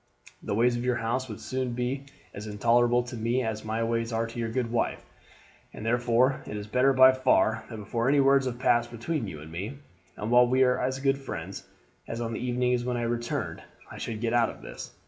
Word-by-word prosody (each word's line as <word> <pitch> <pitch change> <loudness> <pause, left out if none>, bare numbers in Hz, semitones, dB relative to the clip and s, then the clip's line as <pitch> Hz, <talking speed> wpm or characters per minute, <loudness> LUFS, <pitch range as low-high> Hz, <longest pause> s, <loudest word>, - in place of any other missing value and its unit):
The 100 - -2
ways 120 +2 +3
of 120 - -3
your 125 -1 +1
house 120 +3 -2
would 105 - -7
soon 130 -2 -3
be 125 +3 -3 0.3
as 105 +2 -7
intolerable 120 +3 +3
to 120 0 -8
me 120 +3 0
as 110 -1 -3
my 110 +1 -1
ways 115 0 -1
are 115 0 0
to 115 +1 -7
your 115 -1 -1
good 115 0 -2
wife, 120 - -1 0.7
and 110 - -8
therefore 120 +3 +2
it 105 - -5
is 105 - -5
better 125 +5 +3
by 130 0 +8
far 115 -3 +2
that 115 - -7
before 115 +4 -1
any 145 +1 +4
words 135 -1 +4
have 120 -1 -3
passed 120 -2 +2
between 120 +2 -3
you 80 -5 -7
and 80 +1 -11
me, 100 +11 -5 0.4
and 105 +3 -3
while 125 0 +6
we 130 +2 +4
are 125 -1 +2
as 130 +1 -1
good 135 0 +1
friends 95 -8 -7 0.4
as 115 - -4
on 115 -1 -3
the - - -3
evening 125 0 +1
when 125 0 -1
I 120 - -2
returned, 120 0 -2 0.3
I - - -9
should 110 -1 -4
get 115 -1 0
out 120 -1 +3
of - - -11
this. - - -8
120 Hz, 225 wpm, -28 LUFS, 115-125 Hz, 0.7 s, by